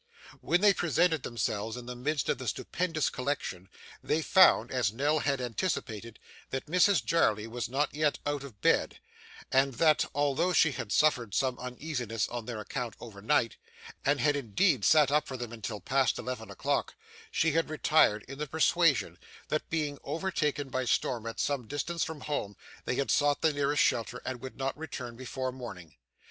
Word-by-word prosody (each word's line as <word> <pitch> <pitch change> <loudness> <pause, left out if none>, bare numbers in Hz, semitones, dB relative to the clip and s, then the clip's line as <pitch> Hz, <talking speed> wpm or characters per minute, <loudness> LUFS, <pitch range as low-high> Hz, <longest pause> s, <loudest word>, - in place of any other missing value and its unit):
When 175 - +1
they 205 -1 +6
presented 170 -3 +2
themselves 110 -1 -2
in 125 - -8
the 125 0 -6
midst 145 +3 -1
of - - 0
the 130 - -6
stupendous 165 - -1
collection, 125 -9 -3 0.3
they 160 +1 0
found, 185 - +5
as 125 -6 +1
Nell 145 +7 +1
had 140 -2 0
anticipated, 115 - -3 0.3
that 135 - -3
Mrs 180 - +3
Jarley 110 -8 +2
was 120 0 -4
not 140 +4 0
yet 150 0 +1
out 145 -1 -1
of 115 -9 -12
bed, - - +2 0.5
and 135 0 +3
that, 155 0 +4
although 145 +5 +1
she 160 -2 +5
had 115 -5 -5
suffered 120 -9 +2
some 130 -2 0
uneasiness 125 -3 -3
on 120 -2 -5
their 120 -3 -4
account 120 +2 -4
overnight, 110 0 -1 0.5
and 145 0 +2
had 145 +3 +3
indeed 135 - +1
sat 150 +1 +5
up 150 +1 +2
for 130 - -5
them 120 -2 -6
until 110 -1 -5
past 135 -1 +1
eleven 125 -3 -5
o'clock, - - -1 0.3
she 160 - +2
had 165 +1 +1
retired 155 -8 +3
in 135 +2 -9
the 150 - -3
persuasion, 160 0 +2 0.3
that, 155 - -2
being 150 -3 -2
overtaken 150 -3 -1
by 130 0 -1
storm 120 -1 0
at 115 - -6
some 140 -5 -1
distance 165 +6 -2
from 160 -2 -5
home, 105 -9 -3 0.3
they - - -1
had 140 +1 0
sought 145 -1 +2
the 160 -2 +4
nearest 145 0 +2
shelter, 120 +2 0
and 130 -2 -4
would 130 - -8
not 135 0 -2
return 130 -6 -7
before 130 +1 -4
morning. 100 - -9
135 Hz, 175 wpm, -30 LUFS, 120-150 Hz, 0.5 s, they